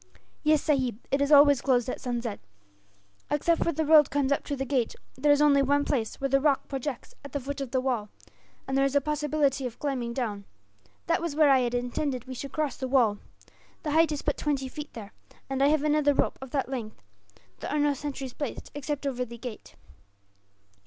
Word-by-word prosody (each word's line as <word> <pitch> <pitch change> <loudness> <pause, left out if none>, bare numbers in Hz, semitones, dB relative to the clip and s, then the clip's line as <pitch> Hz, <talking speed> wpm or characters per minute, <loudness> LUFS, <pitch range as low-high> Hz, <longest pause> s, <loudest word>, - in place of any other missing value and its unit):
"Yes, 305 -1 +3
sahib, 260 -7 +1
it 275 - +2
is 285 +1 +1
always 285 -2 +7
closed 250 -3 +2
at - - -4
sunset. 235 -3 -3 0.9
Except 325 +3 +2
where 335 - +1
the 315 0 -1
road 300 -2 +7
comes 285 -1 0
up 280 - +1
to 285 - -2
the 270 0 -3
gate, 255 -4 0 0.2
there 295 +3 +3
is 290 +1 +5
only 285 -2 +5
one 285 +1 +2
place 235 -6 -1
where 275 - 0
the 275 0 +2
rock 285 -2 +2
projects 270 -1 -5
at 280 - -10
the 285 - -1
foot 280 +2 -5
of 270 - -4
the 260 - 0
wall, 245 -5 -1 0.6
and 270 - -2
there 275 - +3
is 275 0 0
a - - +6
possibility 295 -2 0
of 240 - -10
climbing 260 -5 -2
down. 215 -5 -3 0.6
That - - +1
was 335 -4 -3
where 300 -2 +5
I 265 - +6
had 245 -1 0
intended 245 +1 -2
we 260 - -7
should 275 +2 -6
cross 300 -5 -2
the 260 - -3
wall. 235 -6 +3 0.6
The 300 - -2
height 320 +1 +4
is 295 - -3
but 290 - -1
twenty 275 -3 -1
feet, 295 +3 -8
there, 210 -3 -9 0.4
and 270 0 -1
I 275 - +5
have 300 0 +2
another 300 -1 +3
rope - - 0
of 265 - -7
that 270 +1 -1
length. 240 -5 -6 0.6
There - - -5
are 300 - -1
no 290 -1 +3
sentries 275 -2 -5
placed, 290 - -6
except 290 0 -4
over 255 -2 -1
the 235 -1 -8
gate. 235 -2 -9
275 Hz, 215 wpm, -27 LUFS, 255-290 Hz, 0.9 s, always